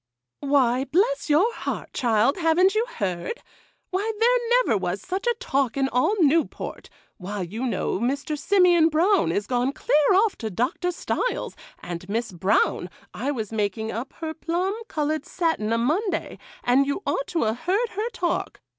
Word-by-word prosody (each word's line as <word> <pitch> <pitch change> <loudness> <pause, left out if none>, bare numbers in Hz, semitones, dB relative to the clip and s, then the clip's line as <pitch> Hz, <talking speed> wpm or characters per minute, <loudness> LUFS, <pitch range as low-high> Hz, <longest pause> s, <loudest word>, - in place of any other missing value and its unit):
'Why, 270 -2 +2
bless 390 - +1
your 365 +11 +4
heart, - - -5
child, 235 - +2
haven't 355 +3 +3
you 445 +3 +1
heard? 185 - -3 0.5
Why, 400 +4 0
there 485 +1 +3
never - - +2
was - - -2
such 385 +5 -4
a 475 - +3
talk 275 - -1
in 270 -1 +2
all 255 - +2
Newport. 315 +2 0 0.3
Why, 200 +1 -5
you 220 +9 -4
know 225 - -1
Mr. 280 +6 -1
Simeon 350 +1 +4
Brown 335 - +3
is 200 +4 -1
gone 250 +3 0
clear 295 +3 +2
off 415 +1 +3
to 220 - -3
Doctor 250 - -1
Stiles; - - -2 0.3
and 175 +1 -6
Miss 230 +1 -2
Brown, 185 0 +1 0.2
I 260 +5 -3
was 225 -7 -3
making 220 +1 -1
up 235 +5 -5
her 320 -1 -5
plum 345 +4 -1
coloured 310 0 -1
satin 320 -12 -1
a' 230 - +2
Monday, 330 - -1 0.2
and 265 +3 +3
you 285 +8 -2
ought - - -1
to 335 - 0
'a' 220 -1 +1
heard 375 - 0
her 430 +3 -3
talk. 355 -7 -2
295 Hz, 165 wpm, -24 LUFS, 230-375 Hz, 0.5 s, your